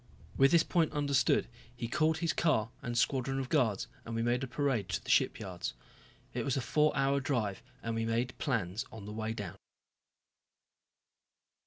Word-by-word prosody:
With 135 0 +6
this 165 +1 +5
point 165 -4 +1
understood 140 - +2 0.3
he 120 -1 -4
called 155 +6 +2
his 165 - +2
car 125 -9 +2
and 120 0 -3
squadron 135 +2 +1
of 130 -1 -4
guards 120 - +2 0.2
and 115 - -5
we 115 - 0
made 120 +2 +1
a - - -2
parade 130 - 0
to - - -2
the - - -1
shipyards. - - 0 0.6
It - - -1
was 140 - 0
a - - +2
four 150 +4 +3
hour 135 +1 +3
drive 115 -8 -1 0.2
and 115 - -2
we 115 0 -1
made 115 +2 0
plans 110 - -1
on 110 -3 -9
the 105 - -6
way 110 0 -2
down. 100 -6 -6
125 Hz, 175 wpm, -32 LUFS, 115-140 Hz, 0.6 s, With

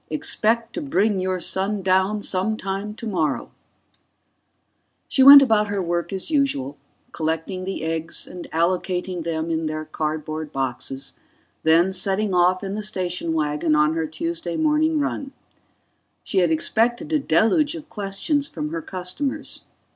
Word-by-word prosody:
Expect 225 +9 0
to 335 - -4
bring 215 -8 +1
your 185 0 -1
son 195 +3 -2
down 190 +3 +2
sometime 200 +1 -2
tomorrow_. 190 -9 -2 1.6
She 270 - +2
went 280 +1 +11
about 215 -5 +2
her 205 -1 -2
work 175 0 -2
as 190 - -5
usual, 145 - 0 0.3
collecting 165 +4 -3
the 190 -3 -4
eggs 165 0 -3
and 180 - -9
allocating 180 +1 -1
them 165 0 -2
in 160 -1 -1
their 155 0 -4
cardboard 155 0 -4
boxes, 135 0 -4 0.5
then 170 +4 +4
setting 195 +2 0
off 180 +1 +3
in 195 0 -4
the 215 - -3
station 180 -5 -2
wagon 150 0 +1
on 150 +1 +3
her 160 -1 -1
Tuesday 165 +2 -4
morning 310 0 +2
run. 280 -1 -3 0.9
She 195 - 0
had 175 -2 +3
expected 240 - +1
a 305 - +4
deluge 290 +4 +2
of 315 - -9
questions 210 +9 -1
from 150 -2 -5
her 165 0 -3
customers. 185 - -4
185 Hz, 140 wpm, -23 LUFS, 160-215 Hz, 1.6 s, went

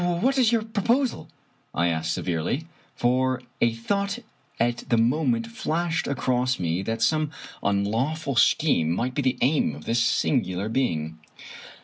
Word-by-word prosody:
"What 190 +11 +1
is 240 -3 +4
your 230 -2 +2
proposal?" 230 +4 0 0.5
I 85 0 +2
asked 80 0 -1
severely; 90 - -2 0.3
for 130 +1 +1 0.2
a 120 - +4
thought 200 - -1 0.4
at 120 +1 +2
the 115 - +3
moment 120 0 +2
flashed 160 +8 -2
across 130 -2 0
me 85 +1 -1
that 115 +3 -2
some 155 -1 +2 0.3
unlaw 105 +9 0
ful 140 -4 -3
scheme 100 - +3
might 125 +6 -1
be 145 - 0
the 130 -2 +1
aim 130 - +2
of 75 - -11
this 115 +1 +1
singular 110 -5 +1
being. 80 -11 -1
125 Hz, 145 wpm, -25 LUFS, 105-160 Hz, 0.5 s, is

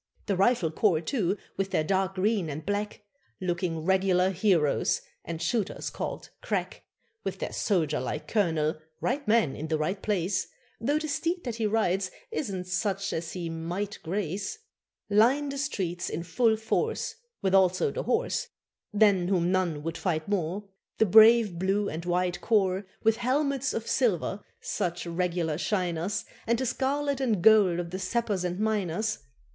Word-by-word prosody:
The 200 - 0
Rifle 195 -3 +3
Corps, 170 -1 +2
too, 190 - -1 0.2
with 195 0 -1
their 155 - +1
dark 190 +2 0
green 200 -3 +1
and 150 +1 -6
black, 205 +1 -2 0.4
Looking 175 -3 -2
regular 190 0 +3
heroes, 180 -6 +2 0.2
and 165 0 -5
shooters 205 +5 -1
called - - -5
"crack," - - -2 0.4
With - - -3
their - - -4
soldier 165 -8 +1
like 130 +4 -4
colonel 160 -7 +1 0.2
right 275 0 -1
man 215 -10 +3
in 155 - -5
the 160 0 0
right 185 +6 -2
place, 190 -2 0 0.3
Though 285 +6 +1
the 310 0 -2
steed 335 +4 -1
that 240 -3 -4
he 220 -2 +1
rides 195 -3 +1 0.2
isn't 200 - -3
such 195 +1 -1
as 165 0 -3
he 175 -2 -4
might 175 +6 -4
grace 195 - -3 0.5
Line 240 +8 +4
the 275 0 -4
streets 185 - -2
in 165 - -3
full 220 +6 +2
force, 225 - -1 0.3
With 190 -1 +1
also 185 -1 +4
the - - -3
horse, 460 +2 0 0.4
Than 205 -4 +4
whom 180 -2 +2
none 175 -6 0
would 165 0 -4
fight 160 -4 -1
more 195 0 -1 0.3
The 220 - +4
brave 220 -2 +6
blue 195 +2 +1
and 165 +2 -5
white 180 0 0
corps, 195 -3 +1 0.2
With 225 0 +4
helmets 270 +2 0
of 225 - -3
silver 220 - 0 0.2
such 175 -4 -2
regular 170 -2 -1
shiners 185 0 -1 0.2
And 235 +1 +3
the 260 - -1
scarlet 280 +2 0
and 220 -9 +1
gold 210 -6 +6
of 170 -1 -4
the 185 - -4
sappers 200 0 -1
and 180 +1 -2
miners. 215 -1 0
195 Hz, 160 wpm, -28 LUFS, 175-220 Hz, 0.5 s, brave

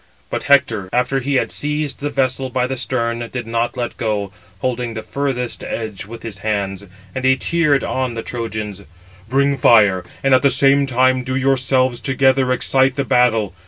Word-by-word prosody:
But - - -3
Hector, 125 -9 +2
after 125 +2 +1
he 140 +2 -1
had - - +1
seized 150 -1 -3
[the 145 - -2
vessel] 130 -1 -1
by 125 0 0
the 130 +1 -3
stern, 115 -1 -2
did 125 -2 -4
not 115 +2 -2
let 120 -1 -4
go, 105 -3 -2 0.3
holding 125 -2 -2
the 110 - -5
furthest 130 -4 -3
505 115 - -3
edge 100 - -6
with 115 +1 -10
his 105 -4 -7
hands, 100 -2 -3 0.3
and 130 - -4
he 130 0 +4
cheered 150 -2 +1
on 130 -2 -2
the 115 - -4
Trojans: 110 -4 -5 0.5
"Bring 140 +2 +1
fire, 100 -6 +5 0.2
and 135 -1 +3
at 130 - +5
the 140 - +4
same 140 +1 +4
time 130 0 +2
do 130 0 -3
yourselves 130 -2 +2
together 130 -1 +2
excite 130 +1 +2
the 140 0 -1
battle. 115 -6 +2
130 Hz, 185 wpm, -19 LUFS, 115-135 Hz, 0.5 s, fire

